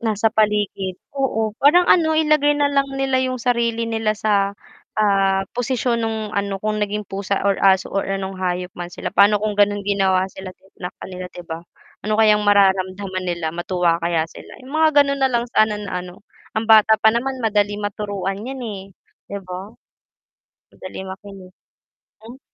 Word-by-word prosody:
Nasa 220 -1 +1
paligid, 210 -3 0 0.2
oo 250 -6 -1
parang 310 +6 +6
ano, 315 -3 +4
ilagay 305 -2 +3
na 290 -1 +1
lang 275 -1 +2
nila 270 -1 +1
yung 260 0 0
sarili 235 -2 +1
nila 225 -2 -1
sa, 200 -2 +1 0.4
ah, 195 -2 +2
posisyon 245 0 -1
nung 220 -2 -3
ano 200 -2 -3
kung 215 0 -1
naging 210 0 -2
pusa 200 0 -3
or 200 -1 +1
aso 190 -1 +3
or 195 - -1
anong 195 -1 -4
hayop 180 -1 -2
man 175 - -4
sila - - -4
paano 205 +1 +4
kung 210 -1 -2
ganun 205 0 +3
ginawa 195 -2 +2
sila 190 0 -9 0.2
sakanila 180 0 -7
'di 175 - -8
ba? 165 -1 -6 0.5
Ano 215 - +1
kayang 210 -1 +4
mararamdaman 190 -1 +2
nila, 170 -2 -2
matuwa 175 0 0
kaya 170 -1 0
sila? - - -12
Yung 255 - -12
mga 310 -1 +4
ganun 280 0 -2
nalang 245 -3 0
sana 215 -2 +3
na 210 -2 -6
ano, 180 +1 -10 0.3
ang 220 +1 -1
bata 220 0 +7
pa 220 +1 +4
naman 255 +3 -2
madali 205 -2 +1
maturuan 205 -1 -4
yan, 265 0 -6
eh. 205 -5 -5 0.4
'Di 200 - -5
ba? 185 +4 -8 1.0
Madaling 190 0 -8
makinig. 195 -1 -12 0.7
Mm. 245 +3 -11
205 Hz, 165 wpm, -21 LUFS, 190-230 Hz, 1.0 s, bata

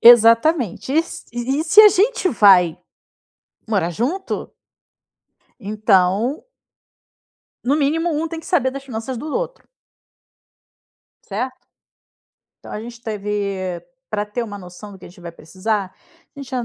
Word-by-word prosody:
Exatamente 235 - +5
e 315 - +3
s 330 - -3
e 265 +6 -1
se 380 +6 +7
a 430 - +10
gente 420 +1 +2
vai 185 -7 +5 0.9
morar 195 -6 0
junto 280 - -3 1.1
então 210 - +1 1.2
no 275 +4 +1
mínimo, 320 +4 +1
um 315 +1 -1
tem 330 -1 -6
que - - -15
saber 265 -8 +1
das 275 +1 -7
finanças 245 0 -5
do 295 - -6
outro. - - -4 1.6
Certo. 250 +6 -5 0.9
Então - - -12
a - - -4
gente 235 +1 -10
teve 200 -4 -3 0.3
para 205 - -2
ter 210 +4 -4
uma 205 -3 -7
noção 185 +3 -11
do 190 - -13
que - - -14
a - - -10
gente 180 +1 -17
vai 170 -1 -8
precisa 185 +6 -3
a - - -18 0.5
gente 275 -2 -8
já 250 -2 -2
230 Hz, 140 wpm, -20 LUFS, 200-285 Hz, 1.6 s, a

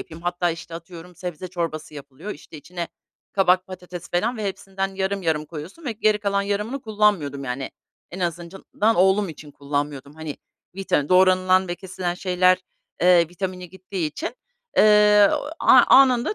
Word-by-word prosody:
yapayım 165 +1 -10
hatta, 175 0 0
işte, 165 0 -8
atıyorum 170 +1 -10
sebze 180 -1 -6
çorbası 165 -4 -4
yapılıyor, 145 +7 -9
işte, 155 -2 -10
içine 170 +3 -6 0.4
kabak, 185 -1 +3
patates 180 -2 -9
falan 220 +8 0
ve 215 - -4
hepsinden 195 0 -4
yarım 195 +1 -2
yarım 155 -3 0
koyuyorsun 165 - -9
ve 245 - -2
geri 215 -1 +2
kalan 200 -1 0
yarımını 210 +7 -2
kullanmıyordum, 205 -11 +1
yani, 135 +1 -4 0.4
en 185 - -8
azından 180 +5 -1
oğlum 190 +2 +3
için 150 -2 -10
kullanmıyordum. 145 0 -4
Hani, 160 -2 -7 0.4
vita 150 -7 0
doğranılan 185 0 +4
ve 175 - -2
kesilen 180 -1 -4
şeyler, 185 0 +2 0.4
eee, 175 -2 +5
vitamini 180 +1 -5
gittiği 185 -1 -4
için, 320 - -5 0.4
eee, 210 -1 +6 0.3
a - - +7
anında 260 - +5
180 Hz, 150 wpm, -23 LUFS, 165-200 Hz, 0.4 s, a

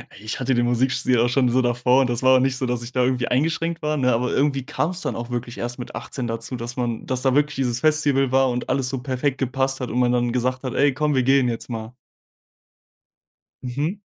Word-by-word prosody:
Ich 110 +4 -6
hatte 130 0 +1
den 120 0 +2
Musikstil 125 0 +1
auch 120 - +3
schon 125 0 +2
so 130 +2 +2
davor. 125 +2 +3
Das 120 0 -2
war 130 0 +6
auch - - +3
nicht 130 0 +1
so, 130 - -2
dass 120 -1 -2
ich 120 +1 -8
da 125 - +2
irgendwie 125 -1 0
eingeschränkt 165 +5 0
war, 150 -1 -1
ne? 125 -2 +2
Aber 125 +2 0
irgendwie 140 -2 +1
kam's 165 +5 -2
dann - - -2
auch 120 +1 -5
wirklich 120 0 -4
erst 120 +1 -4
mit 125 - -7
18 125 -3 -5
dazu, 115 +2 -5
dass 120 0 -6
man 120 -2 -2
dass 130 -1 -2
da 130 0 +2
wirklich 150 0 +2
dieses 125 -2 -1
Festival 145 -4 +2
war 135 0 +3
und 125 0 -3
alles 130 -2 0
so 135 0 -3
perfekt 130 +2 -1
gepasst 135 0 -1
hat 125 - -3
und 125 - 0
man 125 -1 +3
dann 120 -1 +1
gesagt 125 +1 -1
hat: 130 - -3
„Ey 140 0 +3
komm, 150 +2 0
wir 130 -2 +2
gehen 135 -1 +3
jetzt 115 +1 -5
mal.“ 110 0 -6 1.7
Mhm. 145 +10 -3
130 Hz, 240 wpm, -22 LUFS, 120-135 Hz, 1.7 s, war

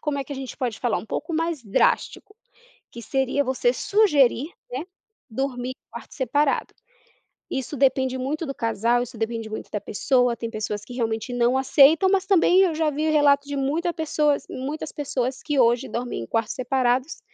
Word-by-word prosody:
como 295 -2 -2
é 275 - -3
que 285 - -8
a - - -6
gente 265 -2 -7
pode 240 -4 -3
falar? 240 -3 0
Um - - -9
pouco 315 +8 -4
mais 325 -4 -1
drástico, 215 - 0 0.6
que 235 - -10
seria 270 +3 0
você 265 - +1
sugerir, 300 - +3 0.2
né, 260 +6 -4 0.5
dormir 250 +1 -3
de - - -64
quarto - - -10
separado. 285 +1 0 0.8
Isso 265 +2 -4
depende 260 -1 +2
muito 300 +5 -3
do 275 - -4
casal, 230 +2 +1
isso 245 0 -8
depende 225 0 -3
muito 215 - -7
da 210 - -3
pessoa, 245 +2 +1
tem 230 - -5
pessoas 210 -2 -4
que 245 - -11
realmente 225 0 -2
não 245 +1 +2
aceitam, 290 +7 +5
mas 390 -1 +1
também 370 -1 +4
eu 355 -5 +3
já 315 -1 +1
vi 305 +2 -1
relato 285 -2 +4
de 285 -1 -4
muita 315 +6 0
pessoas 300 -3 0
muitas 290 +4 -5
pessoas 265 -3 -3
que 295 -3 -1
hoje 240 +1 +3
dormem 240 - -4
em 115 - -7
quartos 225 -1 -1
separados 255 +2 0
265 Hz, 185 wpm, -24 LUFS, 240-300 Hz, 0.8 s, aceitam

